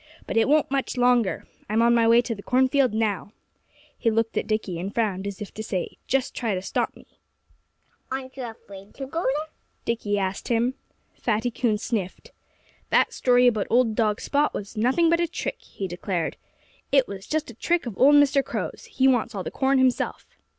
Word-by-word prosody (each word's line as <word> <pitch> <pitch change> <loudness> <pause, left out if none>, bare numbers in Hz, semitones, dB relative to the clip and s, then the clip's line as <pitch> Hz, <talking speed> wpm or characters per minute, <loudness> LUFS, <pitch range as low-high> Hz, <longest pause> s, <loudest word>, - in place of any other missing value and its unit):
"But - - -5
it 225 - +4
won't 300 -2 +3
much 270 -1 -1
longer. 245 -4 +2 0.2
I'm 220 +2 +2
on 235 0 +5
my 230 -1 +4
way 230 +1 +6
to 235 - -2
the 200 - -9
cornfield 260 +2 +3
now." 215 -1 -1 0.6
He 230 - +1
looked 225 0 0
at - - -1
Dickie 215 -5 -2
and 190 +3 -4
frowned, 200 -4 -1
as 200 0 -6
if 210 - -7
to 220 - -6
say, 190 -4 -4
"Just 270 0 0
try 225 -5 -1
to 185 - -3
stop - - -1
me!" - - -16 1.1
"Aren't 260 0 -5
you 260 -2 -5
afraid 200 -3 -11
to 270 - -5
go 330 +5 -3
there?" 300 +3 -1 0.3
Dickie 215 -3 -1
asked 195 -1 -2
him. 240 +2 +1 0.4
Fatty 230 +1 -1
Coon 230 -2 0
sniffed. 205 -4 -4 0.6
"That - - +3
story 250 -1 +4
about 220 -5 +2
old 235 -1 +3
dog 215 -2 +1
Spot 290 +1 +1
was 205 +2 -6
nothing 255 +10 +3
but 335 +1 +3
a 340 - +1
trick," 330 - -4
he 195 - -6
declared. 175 -1 -3 0.6
"It 275 -2 +4
was 195 -1 -8
just 310 -4 -2
a - - -13
trick 340 +8 0
of 235 -5 -5
old 285 +7 +6
Mr. 285 -1 +5
Crow's. - - -5
He 265 - +2
wants 235 -4 +2
all 190 - -3
the - - -5
corn 270 0 +2
himself." 260 -1 +1
235 Hz, 200 wpm, -25 LUFS, 210-265 Hz, 1.1 s, way